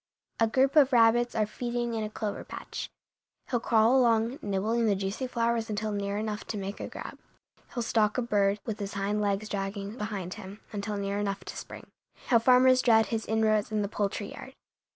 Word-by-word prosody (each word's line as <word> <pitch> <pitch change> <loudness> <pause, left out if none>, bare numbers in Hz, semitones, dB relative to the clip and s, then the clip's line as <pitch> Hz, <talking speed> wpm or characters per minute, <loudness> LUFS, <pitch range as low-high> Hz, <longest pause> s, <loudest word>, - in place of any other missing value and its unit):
A 225 - +4
group 265 +5 +2
of 285 -3 +6
rabbits 240 +1 +4
are 215 -1 +2
feeding 240 +2 -3
in 220 -1 -2
a 215 - -3
clover 215 -1 -4
patch. - - -7 0.6
He'll 240 - +2
crawl 225 +2 +4
along, 235 0 +3
nibbling 215 +4 0
the 205 - +3
juicy 195 +7 -3
flowers 235 -1 0
until 215 0 -2
near 200 0 -2
enough 215 0 -3
to 215 - -4
make 200 +1 -5
a - - -4
grab. - - -8 0.6
He'll 240 - -1
stalk 220 -1 +1
a 250 - +1
bird, 205 -3 +2
with 220 -2 -4
his 200 -1 -5
hind 200 +2 -1
legs 205 +1 0
dragging 200 +2 -4
behind 200 -4 -4
him, 195 +2 -10
until 205 0 -3
near 200 0 -2
enough 195 -2 -3
to - - -7
spring. - - -8 0.4
How 235 - +6
farmers 255 +2 +5
dread 225 -2 +5
his 225 0 -2
inroads 220 -1 +2
in 215 -1 0
the - - -1
poultry 205 0 -2
yard! 265 - -10
215 Hz, 195 wpm, -28 LUFS, 200-235 Hz, 0.6 s, of